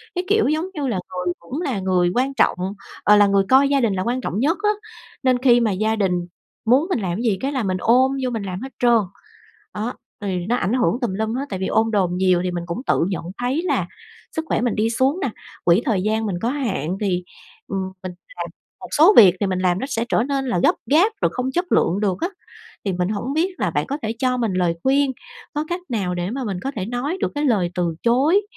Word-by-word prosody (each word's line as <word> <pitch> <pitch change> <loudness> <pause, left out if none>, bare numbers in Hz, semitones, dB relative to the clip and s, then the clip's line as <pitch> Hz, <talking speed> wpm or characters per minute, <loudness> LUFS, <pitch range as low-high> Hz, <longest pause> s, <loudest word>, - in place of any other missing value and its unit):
Cái, 360 - -1
kiểu, 425 +2 +3
giống 310 +4 0
như 290 -6 -2
là 215 -7 -1 0.2
người 180 -1 -1
cũng 255 - -6
là 270 - -1
người 185 -2 +2
quan 260 +3 +1
trọng, 270 - +2 0.5
ờ, 210 - +6
là 205 0 +6
người 200 0 +3
coi 270 +2 +6
gia 280 -1 +2
đình 225 -5 +2
là 185 -1 -1
quan 245 +4 -1
trọng 200 -4 -3
nhất 295 +7 +2
á, 420 - +4 0.5
nên 255 -1 +3
khi 240 -2 +6
mà 230 -3 +1
gia 215 +3 0
đình 195 -4 +1 0.5
muốn 260 +8 +4
mình 365 - 0
làm 185 -4 -2
cái 225 - -3
gì 215 -5 +1
cái 275 - -1
là 260 -4 -1
mình 185 -2 0
ôm 255 +4 +4
vô 255 - 0
mình 225 -3 -3
làm 185 0 -5
hết 265 +1 -7
trơn. 240 -2 +5 0.8
Đó, 220 +4 -2 0.3
thì 185 -3 -2
nó 240 - +2
ảnh 200 -3 -1
hưởng 250 -1 +1
tùm 235 -7 -1
lum 220 +2 -1
hết, 270 +3 -2
tại 190 - -3
vì 190 - -1
ôm 225 +1 +2
đồm 195 -5 +1
nhiều 185 -1 +3
thì 180 - 0
mình 175 -1 -4
cũng 170 +8 -4
tự - - +2
nhận 185 -4 -3
thấy 255 +6 0
là - - 0 0.5
sức 320 - -3
khỏe - - +1
mình 240 -1 0
đi 220 +1 +1
xuống 265 +9 +1
nà, 270 - -1 0.3
quỹ 175 +6 +4
thời 210 -8 +1
gian 220 +2 0
mình 195 -4 -2
có 230 - +1
hạn 195 - -2
thì, 180 -4 0 0.4
ừm, 195 - -2 0.2
mình 185 -1 -5 0.2
làm - - -3 0.3
một - - -8
số 335 +8 +7
việc 190 -6 +9
thì 205 - +1
mình 185 -1 -1
làm 180 -1 +1
nó 265 - -3
sẽ 225 - 0
trở - - +2
nên 275 0 -1
là 185 -9 0
gấp - - +5 0.2
gáp 350 +10 +5
rồi - - +3
không 255 +1 -2
chất 355 +5 -1
lượng 185 +4 +2
được 195 -3 0
á. 345 - 0 0.6
Thì 195 - 0
mình 180 0 -1
hổng 215 +6 -3
biết 355 +4 0
là - - +1
bạn - - -1
có 280 +1 -3
thể 220 - -1
cho 255 0 +1
mình 230 -5 0
lời 175 -2 +1
khuyên, 275 0 +2 0.4
có 300 +1 -1
cách 350 +1 -2
nào 195 -6 -1
để 175 +1 -2
mà 260 +2 -3
mình 195 -5 -3
có 270 - -2
thể 190 -3 -2
nói 250 - -2
được - - -1
cái 295 +1 -1
lời 205 -10 +2
từ 175 -2 -1
chối 280 - +3
225 Hz, 255 wpm, -21 LUFS, 190-270 Hz, 0.8 s, việc